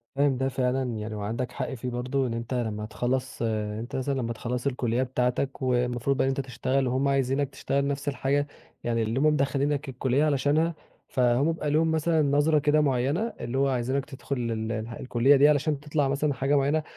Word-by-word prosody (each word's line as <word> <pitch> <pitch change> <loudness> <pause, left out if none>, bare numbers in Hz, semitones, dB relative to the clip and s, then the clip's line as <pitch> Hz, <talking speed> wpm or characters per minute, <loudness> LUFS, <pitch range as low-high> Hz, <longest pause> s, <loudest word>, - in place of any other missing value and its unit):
فاهم 140 -1 +2
ده 135 +1 0
فعلًا 130 0 0
يعني 110 0 -5
وعندك 115 +4 -3
حق 125 - -4
فيه 125 0 -4
برضه، 125 +2 -1
إن 115 - -3
أنت 115 +2 -4
لما 110 -4 -2
تخَلّص 125 +4 -2
أنت 110 0 -2
مثلًا 135 +1 -1
لما 120 -3 -2
تخَلّص 125 +3 -3
الكُلّية 125 -2 0
بتاعتك 125 +2 -1
والمفروض 125 +1 +1
بقى - - +2
إن - - +2
أنت 135 - -1
تشتغل 130 +1 -1
وهُم 130 +3 +1
عايزينك 135 0 +1
تشتغل 140 0 -1
نفس 140 +1 -3
الحاجة، 140 +1 0 0.4
يعني 115 -1 0
اللي 110 +4 -1
هُم 145 - +2
مدَخلينك 140 -1 +1
الكُلّية 130 +3 +1
علشانها، 150 +3 +2 0.3
فهُم 125 +4 +2
بيبقى 155 -2 -3
لهم 160 +2 +3
مثلًا 160 0 +2
نظرة 145 +2 +3
كده 150 +1 +3
معيّنة 145 - 0
اللي 120 +2 -3
هو 140 +1 +3
عايزينك 130 +2 -1
تدخل 140 -1 -5 0.2
ال 110 0 -2
الح 110 0 -4
الكُلّية 130 +3 +3
دي 140 +2 +6
علشان 150 0 +1
تطلع 145 -1 0
مثلًا 140 +2 0
حاجة 135 +2 +1
معيّنة 145 +3 +1
135 Hz, 190 wpm, -27 LUFS, 120-145 Hz, 0.4 s, دي